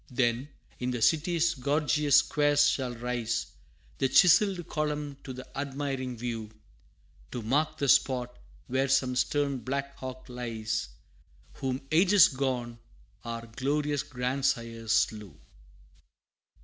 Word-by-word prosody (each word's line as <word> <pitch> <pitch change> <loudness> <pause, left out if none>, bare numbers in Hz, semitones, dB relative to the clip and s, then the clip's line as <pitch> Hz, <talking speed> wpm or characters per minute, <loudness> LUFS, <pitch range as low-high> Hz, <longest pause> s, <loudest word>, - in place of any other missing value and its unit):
Then, 125 +1 0 0.3
in 125 - -2
the 125 -1 -2
city's 165 +2 +2
gorgeous 145 +1 +1
squares 145 0 +4
shall 130 -4 -1
rise 120 -1 -2 0.5
The 135 - +2
chiselled 180 +1 +5
column 150 -2 -2
to 130 - -7
the 130 0 -8
admiring 135 -2 -3
view 115 -2 -4 0.8
To 120 - -5
mark 150 +7 0
the 140 - -1
spot 125 -1 +2 0.3
where 130 +2 0
some 130 -1 +2
stern 140 +1 0
Black 140 +2 -4
Hawk 130 0 -8
lies, 115 - -3 0.6
Whom 130 0 -3
ages 185 +3 +6
gone, 125 -4 -3 0.4
our 115 0 -5
glorious 145 +5 -1
grandsires 125 -3 -2
slew! 105 -6 0
130 Hz, 115 wpm, -29 LUFS, 120-145 Hz, 0.8 s, ages